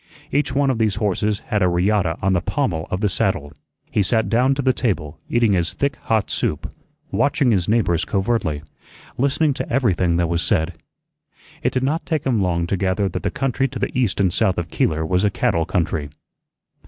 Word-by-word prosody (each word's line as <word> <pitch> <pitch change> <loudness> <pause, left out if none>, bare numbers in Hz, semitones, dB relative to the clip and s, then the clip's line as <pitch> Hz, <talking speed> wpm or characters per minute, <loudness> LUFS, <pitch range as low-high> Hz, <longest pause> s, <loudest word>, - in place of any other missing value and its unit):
Each 145 -1 +1
one 140 -1 +3
of 120 - -2
these 110 -3 +2
horses 105 0 -1
had 105 - +1
a 90 - +4
riata 90 -1 +1
on 95 0 +3
the 90 - +2
pommel 90 - -1
of 95 - -2
the 105 - +3
saddle. 75 -6 -1 0.4
He 105 - +2
sat 110 +3 +1
down 125 +4 +3
to 140 - -2
the 130 0 +3
table, 90 - -2
eating 115 -3 +3
his 85 -2 +1
thick 140 -1 -1
hot 110 -4 -1
soup, 75 - -2 0.4
watching 140 -3 +2
his 95 -5 +1
neighbors 95 -7 +2
covertly, 95 -6 -1 0.6
listening 140 +3 +2
to - - -5
everything 95 -9 +2
that 85 - +2
was 85 0 0
said. 80 +2 +1 0.9
It - - +1
did 130 - -1
not 155 +5 0
take 155 -3 -1
him 120 -6 +2
long 85 -2 0
to 95 +3 -1
gather 95 +1 0
that 90 +1 -4
the - - -1
country 135 0 0
to 130 0 -7
the - - -3
east 120 -7 +1
and 95 -4 +2
south 95 - +2
of 85 -2 -3
Keeler 80 0 0
was 90 +3 +1
a 105 - +4
cattle 85 -4 0
country. 80 -5 -1
100 Hz, 205 wpm, -21 LUFS, 85-125 Hz, 0.9 s, a